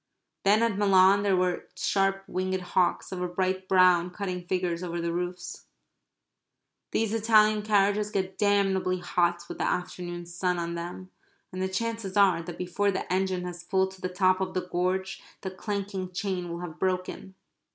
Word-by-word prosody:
Then 210 +3 +5
at 220 -4 0
Milan 195 0 +5
there 200 -2 +2
were 180 -1 0
sharp 195 +1 +1
winged 185 0 -1
hawks, 180 0 0
of 185 -1 -4
a 180 - 0
bright 185 +1 -1
brown, 180 -2 +5
cutting 180 -2 -5
figures 180 -2 -1
over 175 -1 -3
the 170 0 -2
roofs. 180 0 -5 1.2
These 225 -1 0
Italian 215 -1 +4
carriages 205 0 +2
get 190 -2 -2
damnably 195 -3 +2
hot 175 -1 0
with - - -8
the - - 0
afternoon 175 -1 -3
sun 175 +1 -1
on 170 0 -3
them, 175 +2 -6 0.4
and 185 0 -5
the 190 - 0
chances 220 0 -3
are 190 -4 +5
that 170 0 -8
before 180 +3 0
the 190 -1 -2
engine 185 -1 0
has 175 -1 -6
pulled 190 +1 +1
to 190 -1 -15
the 185 - -2
top 185 0 +2
of 185 -1 -3
the 180 -1 -2
gorge 185 +2 -1 0.2
the 190 - -4
clanking 195 -1 -4
chain 185 -1 -3
will 170 +1 -5
have 170 -3 -7
broken. 185 0 -2
185 Hz, 170 wpm, -27 LUFS, 180-195 Hz, 1.2 s, Then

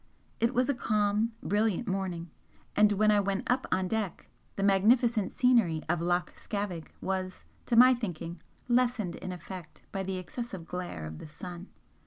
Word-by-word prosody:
It 230 +2 +1
was 250 +1 +3
a 285 - +2
calm, 215 -1 +1
brilliant 215 +2 +1
morning, 185 -4 -3 0.4
and 210 0 +5
when 215 +1 +4
I 210 - +5
went 200 0 0
up 255 +1 +1
on 185 0 +1
deck 215 -3 -3 0.2
the 195 - -2
magnificent 215 +2 +4
scenery 225 -11 +3
of 170 0 +1
Loch 175 +1 0
Scavaig 200 -6 -4
was, 185 -1 -3 0.2
to 240 - +2
my 250 +2 +9
thinking, 175 -7 -5 0.3
lessened 240 -7 +2
in 185 - -5
effect 180 -2 -9
by 195 - -2
the 190 0 -3
excessive 190 -1 -6
glare 175 - -5
of 80 0 -7
the - - -9
sun. 175 +4 -8
195 Hz, 165 wpm, -30 LUFS, 180-225 Hz, 0.4 s, my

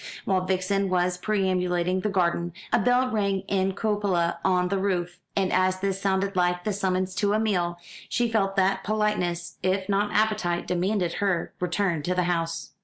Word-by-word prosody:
While 185 -2 +1
Vixen 190 +1 0
was 180 0 +1
perambulating 185 -3 0
the 210 - -1
garden, 175 -3 0 0.2
a - - +5
bell 245 +4 +2
rang 200 -3 0
in 190 0 0
a - - -3
cupola 200 -6 0
on 180 -1 +2
the 195 0 0
roof; 180 -2 -1 0.2
and 195 -2 +1
as 185 0 +2
this 195 0 -2
sounded 195 0 0
like 180 -1 +1
the 210 - -1
summons 185 -1 -1
to 200 +1 +1
a 215 - +2
meal, 175 -6 0 0.3
she 240 -1 +1
felt 200 -4 0
that 195 0 +2
politeness, 200 -5 -1
if 190 +1 0
not 205 +1 +1
appetite, 215 -5 +1
demanded 180 0 0
her 190 -5 0
return 180 -2 0
to 180 +5 -1
the 180 - +2
house. 165 -1 -2
190 Hz, 180 wpm, -26 LUFS, 180-200 Hz, 0.3 s, a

